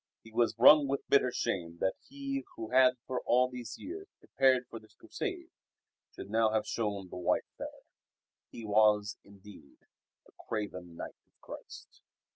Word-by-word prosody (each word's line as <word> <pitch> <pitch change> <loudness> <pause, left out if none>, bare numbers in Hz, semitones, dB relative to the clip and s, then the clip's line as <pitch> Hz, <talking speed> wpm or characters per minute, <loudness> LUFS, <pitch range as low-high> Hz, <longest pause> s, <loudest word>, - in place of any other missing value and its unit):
He 115 - -14
was 120 +1 +1
wrung 145 +4 +8
with 140 +1 -2
bitter 135 -3 +4
shame 85 -7 -2
that 95 +2 0 0.2
he 275 0 -4
who 110 -1 -6
had 130 0 +5
for 130 -1 -3
all 125 +1 +3
these 125 -2 -7
years 390 +6 -8
prepared 130 -1 +2
for 115 - -8
this 110 -1 -21
Crusade - - -5 0.6
should 100 - -9
now 110 0 +3
have 110 -1 0
shown 100 -4 -3
the - - -7
white 90 - +1
feather. - - -8 0.7
He 115 - -9
was, 105 0 +3
indeed, 100 -7 -16 0.5
a - - -21 0.2
craven 95 -6 -4
knight - - -7
of - - -44
Christ. - - -11
115 Hz, 160 wpm, -31 LUFS, 105-130 Hz, 0.7 s, wrung